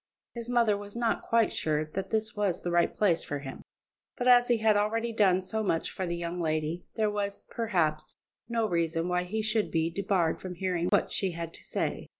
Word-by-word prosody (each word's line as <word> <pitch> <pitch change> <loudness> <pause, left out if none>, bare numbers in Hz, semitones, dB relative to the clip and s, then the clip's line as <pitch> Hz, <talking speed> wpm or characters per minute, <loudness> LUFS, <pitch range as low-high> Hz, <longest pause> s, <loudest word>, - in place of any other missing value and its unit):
His 235 0 -6
mother 235 -4 +3
was 205 +1 -8
not 235 -1 0
quite 230 -1 +2
sure 155 -1 0
that 185 +5 -5
this 220 -1 -1
was 200 -4 0
the 175 - -2
right 170 0 +3
place 185 -6 +2
for 145 - -4
him, 135 -1 -8 0.6
but 245 - -1
as 245 -1 +7
he 240 - +3
had 220 -1 +3
already 225 +3 0
done 190 -4 +3
so 220 +4 -2
much 165 -6 0
for 185 - -3
the 170 - -1
young 170 +1 -4
lady, 155 +1 -2
there 215 -2 +1
was, 200 -1 -3
perhaps, 175 -10 -1 0.3
no 230 -2 +1
reason 165 -2 0
why 180 0 0
he 215 +4 -2
should 215 0 +1
be 165 0 0
debarred 185 -2 0
from 185 -1 -6
hearing 180 -1 -1
what - - +2
she 190 -3 -1
had 165 0 -5
to - - -10
say. - - -3
190 Hz, 210 wpm, -29 LUFS, 170-220 Hz, 0.6 s, as